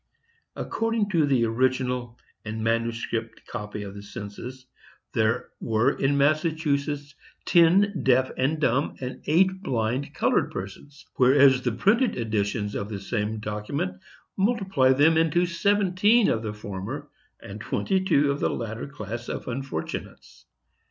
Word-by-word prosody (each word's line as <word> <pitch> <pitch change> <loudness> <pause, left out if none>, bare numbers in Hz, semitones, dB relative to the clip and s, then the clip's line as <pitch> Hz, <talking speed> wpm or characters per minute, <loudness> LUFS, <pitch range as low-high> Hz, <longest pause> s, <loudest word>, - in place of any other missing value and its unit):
According 225 -2 -1
to 160 -5 +3
the 130 -4 +3
original 125 0 0 0.3
and 110 0 -4
manuscript 115 0 -2
copy 105 -2 -6
of 100 -1 -7
the 100 - -9
census, 120 +5 -8 0.5
there 110 0 +1
were 110 0 +2
in 140 +1 0
Massachusetts 145 -1 0 0.3
ten 185 +4 +4
deaf 130 0 +3
and 145 +5 0
dumb 140 -1 +1
and 130 0 -6
eight 190 +4 +3
blind 125 - -2
colored - - +2
persons; 100 +10 -8
whereas 135 0 +6
the 125 - 0
printed 220 - +2
editions 105 -2 -1
of 100 - -4
the 105 -2 -5
same 105 +1 -2
document 105 -3 -4 0.3
multiply 190 - +2
them 150 +4 +4
into 170 +2 +2
seventeen 200 +4 +3
of 110 - 0
the 110 -2 -3
former 105 +7 -6 0.3
and 100 +1 -9
twenty 190 - 0
two 145 -6 +3
of 140 - -3
the - - +1
latter 115 +1 -4
class 120 -3 -7
of - - -5
unfortunates. 125 -9 -6
130 Hz, 135 wpm, -25 LUFS, 110-155 Hz, 0.5 s, whereas